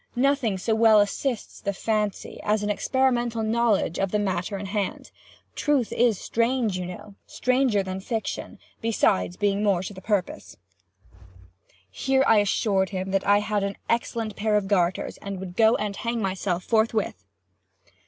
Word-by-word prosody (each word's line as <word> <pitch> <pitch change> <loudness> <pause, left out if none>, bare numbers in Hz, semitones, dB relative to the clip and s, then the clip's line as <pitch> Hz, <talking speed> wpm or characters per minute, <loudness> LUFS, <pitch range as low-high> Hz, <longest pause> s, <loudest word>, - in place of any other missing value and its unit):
Nothing 250 -5 +1
so 220 +5 -1
well 220 -1 +6
assists 220 +4 -2
the 200 - -2
fancy, 210 0 -2
as 210 0 0
an 205 - 0
experimental 240 -1 0
knowledge 220 -6 +1
of 195 - +1
the 210 - 0
matter 195 -1 -2
in 200 - -6
hand. 200 0 -3 0.4
'Truth 285 -6 0
is 235 -4 +3
strange,' 230 -2 0
you 180 -1 -3
know, 205 +3 -9
'stranger 255 -5 +1
than 190 0 -5
fiction'—besides 215 - -2
being 200 0 +1
more 195 -4 +2
to 205 - -6
the 190 - -11
purpose." 205 -4 -2 1.3
Here 265 - +1
I 220 - +5
assured 195 -2 +1
him 190 0 -4
I 205 +1 +4
had 210 -1 -1
an 200 0 -3
excellent 230 -2 -1
pair 215 0 0
of 200 -2 -1
garters, 185 -3 0
and 200 -1 -6
would 180 -1 -7
go 225 +2 +5
and 205 -1 -3
hang 235 +2 -2
myself 185 -2 -2
forthwith. 220 - 0
210 Hz, 155 wpm, -25 LUFS, 195-230 Hz, 1.3 s, well